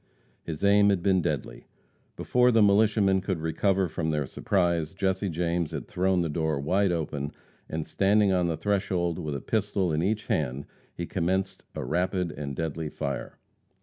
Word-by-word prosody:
His 80 0 -6
aim 100 0 +5
had 95 -3 +1
been 95 -2 +3
deadly. - - -4 0.5
Before 125 0 +3
the 115 -2 +5
militiamen 100 -1 +4
could 95 -3 -2
recover 95 +4 +1
from 80 0 -3
their 75 -2 0
surprise, 85 - 0
Jesse 95 0 0
James 85 -1 -1
had 80 - -6
thrown 95 0 +1
the 85 - 0
door 80 -1 -1
wide 95 +7 +2
open, 75 -4 -3 0.4
and, 80 -1 -3
standing 100 0 +3
on 90 -2 +2
the 80 -2 -1
threshold 90 -2 0
with 75 -4 -3
a 70 - -4
pistol 100 -5 0
in 75 - +1
each 105 +4 -1
hand, 70 -2 -1 0.3
he 85 - -4
commenced 95 +2 -2
a - - -4
rapid 90 +3 0
and 70 -2 -5
deadly 80 0 -3
fire. 70 -3 -5
90 Hz, 170 wpm, -27 LUFS, 80-100 Hz, 0.5 s, aim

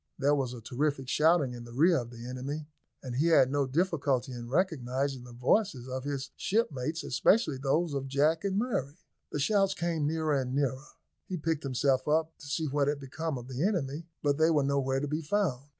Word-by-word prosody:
There 145 +1 +3
was 130 -4 -1
a 120 - -9
terrific 135 +3 -1
shouting 150 -2 +3
in 120 -1 -8
the 120 - -11
rear 165 +5 +4
of 120 -1 -6
the 120 -1 -10
enemy, 135 +4 -4 0.4
and 125 -2 -4
he 155 +5 +3
had 135 -6 +5
no 140 -1 +1
difficulty 140 -4 0
in 120 -1 -7
recognising 135 -5 0
the 125 - -11
voices 125 - +1
of 130 +1 -4
his 140 -1 -3
shipmates, 165 - -1
especially 155 - +2
those 150 +4 +1
of 135 -1 -2
Jack 150 +5 +2
and 195 -1 0
Murray. 190 - -1 0.3
The - - -2
shouts 195 +5 +2
came 165 -4 -1
nearer 155 -1 0
and 130 -2 -1
nearer. 140 0 -1 0.4
He 185 - -3
picked 160 -1 -1
himself 135 -1 +1
up 160 +1 +1
to 145 - -11
see 155 +3 -1
what 140 0 +1
had 145 0 0
become 145 +2 -4
of 120 0 -8
the 130 +1 -4
enemy, 165 -5 -1 0.2
but 145 0 +1
they 160 +1 +5
were 150 -3 +3
nowhere 135 -1 +1
to 145 - -2
be 150 +3 -2
found. 150 -6 0
145 Hz, 205 wpm, -30 LUFS, 130-160 Hz, 0.4 s, had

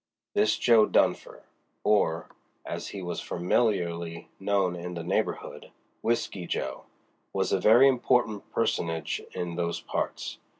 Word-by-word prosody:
This 110 - +3
Jo. 115 -3 +5
Dunfer—or, 85 -6 0 0.4
as - - -5
he 100 -2 -6
was 90 -1 -3
familiarly 85 -3 -1
known 95 -2 +1
in 90 0 -6
the 85 - -4
neighborhood, - - -2 0.3
Whisky 100 -6 -1
Jo.—was 65 0 -5
a - - +3
very 120 +5 +7
important 120 -4 +1
personage 80 -1 -1
in 85 -1 -3
those 85 -1 -1
parts. - - -4
90 Hz, 115 wpm, -28 LUFS, 85-110 Hz, 0.4 s, very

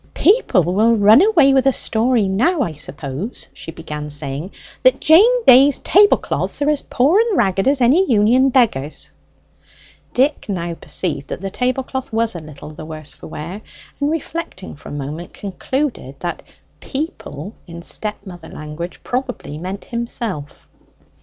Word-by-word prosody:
"People 395 - +3
will 210 +7 +3
run 215 +5 +6
away 335 -10 +5
with 270 0 +3
a - - +6
story 230 -3 +1
now, 280 - +1
I 170 - -4
suppose," 145 - -6
she - - -10
began 150 -2 -6
saying, 145 +3 -3 0.3
"that - - +4
Jane 455 +10 +5
Day's 270 +2 +7
tablecloths 410 +2 +2
are 295 - +3
as 295 - 0
poor 295 +11 +2
and 455 -5 +2
ragged 195 +1 +1
as 275 -1 +2
any 280 +7 +4
union 235 +5 +4
beggar's!" 210 - 0 1.0
Dick 270 -2 +1
now 175 -3 -2
perceived 155 -4 -4
that - - -5
the 195 0 -4
tablecloth 255 +2 -2
was 225 0 0
a 175 - -6
little 150 -1 -11
the 155 - -10
worse 155 -1 -7
for - - -11
wear, 170 +6 -7 0.4
and 285 0 +1
reflecting 320 - -5
for - - -12
a - - -8
moment, 145 +4 -6
concluded 210 - -3
that 175 -1 -4 0.4
'people' 245 - -6
in 170 0 -9
step 210 +3 -4
mother 175 -4 -10
language 155 +3 -7
probably 250 - -4
meant 185 +3 -6
himself. 230 - -5
215 Hz, 155 wpm, -19 LUFS, 165-270 Hz, 1.0 s, Day's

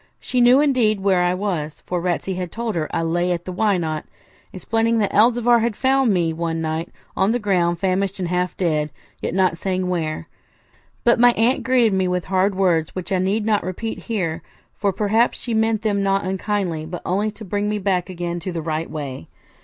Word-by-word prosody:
She 250 - 0
knew, 245 +3 +6
indeed, 245 -8 +2
where 190 -2 +3
I 180 0 +2
was, 170 -7 -3
for 180 -1 -2
Ratsey 180 +2 -1
had 180 -2 -4
told 230 -1 -3
her 155 -3 -2
I - - -1
lay 175 +2 0
at 175 - -2
the 185 - -4
Why 200 +1 +1
Not?, 155 -3 -2 0.5
explaining 225 +5 0
that 205 -3 0
Elzevir 235 +2 +4
had 230 -2 0
found 265 -1 +2
me 170 -4 +1
one 165 0 -2
night 160 +1 -2 0.3
on 195 +4 +2
the - - +2
ground 180 -6 +1
famished 190 +1 0
and 185 -2 -2
half 180 0 -1
dead, 155 -4 0 0.3
yet - - -3
not 185 -3 +2
saying 185 -1 -1
where. 160 -3 -2 0.8
But 235 0 +4
my 245 0 +6
aunt 235 +4 +2
greeted 250 -5 +3
me 190 -1 +1
with 180 -1 -1
hard 190 +1 +1
words, 175 -5 +1
which 185 +1 -5
I 190 - +2
need 200 +4 0
not 215 -2 +2
repeat 220 +5 -4
here; 180 -9 -3 0.3
for, 200 -1 0
perhaps, 215 +4 +1
she 235 - -4
meant 220 -1 +1
them 205 -2 +1
not 195 0 +1
unkindly, 190 -4 -2
but 175 +1 -7
only 200 +4 0
to 215 +1 -10
bring 205 +2 -1
me 210 - -1
back 190 -2 0
again 175 -1 -4
to 185 +2 -5
the 165 -2 -4
right 160 0 -2
way. 135 - -6
190 Hz, 210 wpm, -21 LUFS, 175-215 Hz, 0.8 s, knew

